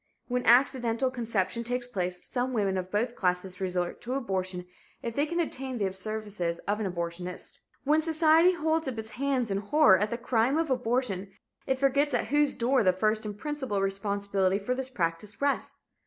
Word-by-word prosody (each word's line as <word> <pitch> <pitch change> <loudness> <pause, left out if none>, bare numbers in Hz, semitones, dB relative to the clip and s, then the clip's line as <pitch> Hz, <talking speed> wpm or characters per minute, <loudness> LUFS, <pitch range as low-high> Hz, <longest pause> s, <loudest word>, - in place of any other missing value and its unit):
When 250 0 -1
accidental 245 0 +4
conception 230 -2 -1
takes 245 +1 -1
place, 180 -6 -4
some 255 0 -1
women 200 -4 +1
of 185 -1 -3
both 235 +5 -1
classes 180 0 -1
resort 180 -2 -2
to 250 +2 -3
abortion 185 -7 -2 0.4
if 235 - -3
they 285 +5 +1
can 340 +2 -2
obtain 265 -6 -3
the 195 -3 -1
services 200 -4 -3
of 205 +1 0
an 200 -4 -1
abortionist. 175 +1 -5 0.2
When 300 +3 +3
society 325 +2 +5
holds 320 -2 0
up 255 -3 -3
its 220 0 -5
hands 255 -3 -1
in 195 - 0
horror 210 -2 +5
at 210 - 0
the 235 - -2
"crime" 245 +3 +1
of 320 -3 0
abortion, 240 -6 0 0.4
it 265 -1 +1
forgets 275 +1 +2
at 220 - -1
whose 295 +1 +3
door 255 +2 +2
the 185 -3 +4
first 215 +3 0
and 205 -1 -6
principal 265 -5 -3
responsibility 195 -1 0
for 205 +5 -2
this 260 0 -4
practice 185 -2 -3
rests. 280 0 0
230 Hz, 185 wpm, -28 LUFS, 195-265 Hz, 0.4 s, society